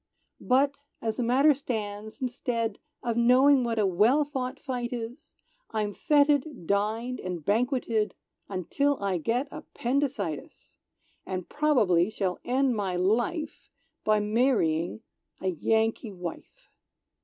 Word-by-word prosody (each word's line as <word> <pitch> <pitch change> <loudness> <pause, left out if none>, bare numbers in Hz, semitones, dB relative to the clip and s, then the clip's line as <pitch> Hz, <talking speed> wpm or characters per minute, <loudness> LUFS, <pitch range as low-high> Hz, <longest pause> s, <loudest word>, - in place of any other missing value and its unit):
"But, 275 +2 +2 0.2
as 225 -1 -2
the - - 0
matter 270 +6 +5
stands, 220 -3 -5
instead 235 -3 -2 0.2
Of 235 -1 -1
knowing 255 +3 +5
what 230 -1 -1
a 210 - +3
well 215 +11 +3
fought 265 -1 -4
fight 250 -3 -3
is, 240 +3 -7 0.3
I'm 210 -2 -2
fêted, 290 - +2
dined 220 +6 0
and 175 -4 -5
banqueted, 230 -1 +1 0.3
Until 265 - 0
I 195 -3 -1
get 240 - 0
appendicitis! 280 -1 -3 0.4
And 185 -2 -4
probably 220 - +3
shall 190 -4 -2
end 255 0 +1
my 195 -4 -1
life 235 - -1 0.3
By 215 0 +3
marrying 210 -6 +1 0.4
a 190 - -1
Yankee 220 - 0
wife! 175 -2 -9
230 Hz, 120 wpm, -28 LUFS, 205-265 Hz, 0.4 s, matter